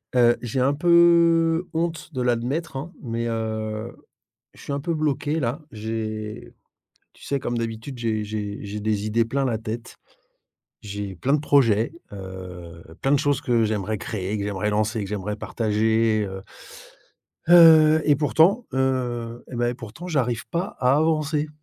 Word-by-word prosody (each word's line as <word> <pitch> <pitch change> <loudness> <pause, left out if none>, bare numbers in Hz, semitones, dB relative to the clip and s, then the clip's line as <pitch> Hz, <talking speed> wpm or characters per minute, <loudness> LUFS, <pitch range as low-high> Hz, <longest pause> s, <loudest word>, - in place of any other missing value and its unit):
Heu, 120 -1 +5
j'ai 120 +1 -3
un 135 +3 +3
peu 170 0 +4
honte 165 0 -3
de 130 - -2
l'admettre, 125 +6 -1
hein, 160 +7 -7
mais, 115 -2 -3
heu, 110 0 -3 0.6
je - - -16
suis - - -7
un 140 - -1
peu 165 +4 -2
bloqué 155 0 -1
là, 130 +3 -2
j'ai, 110 -1 -5 0.6
tu - - -22
sais, 140 - -1
comme 120 -2 -3
d'habitude, 115 +3 -5
j'ai 110 -2 -1
j'ai 105 -1 -4
j'ai 105 +1 -5
des 105 -1 -1
idées 115 +2 +2
plein 135 +4 -1
la 120 -4 0
tête. 110 +1 -6 0.9
J'ai 100 -1 -6
plein 130 +11 0
de 150 - +3
projets, 120 -7 +3 0.2
heu, 90 -3 -9 0.2
plein 135 - +1
de 145 - +5
choses 145 0 0
que 120 -2 +2
j'aimerais 105 0 -2
créer 100 -2 -4
et - - 0
que 100 - -3
j'aimerais 105 0 -2
lancer 110 +2 0
et - - -2
que 95 - -6
j'aimerais 105 0 -3
partager, 110 0 +1
heu 95 0 -7 1.1
heu, 160 -2 +8
et 145 -2 +4
pourtant, 165 - +3
heu, 120 -3 -1
et 125 - -4
bah, 120 0 +1
et - - -5
pourtant, 120 +8 -9
j'arrive 125 -8 -1
pas 180 +4 -3
à 125 +2 +4
avancer. 155 -1 +1
120 Hz, 170 wpm, -24 LUFS, 110-145 Hz, 1.1 s, heu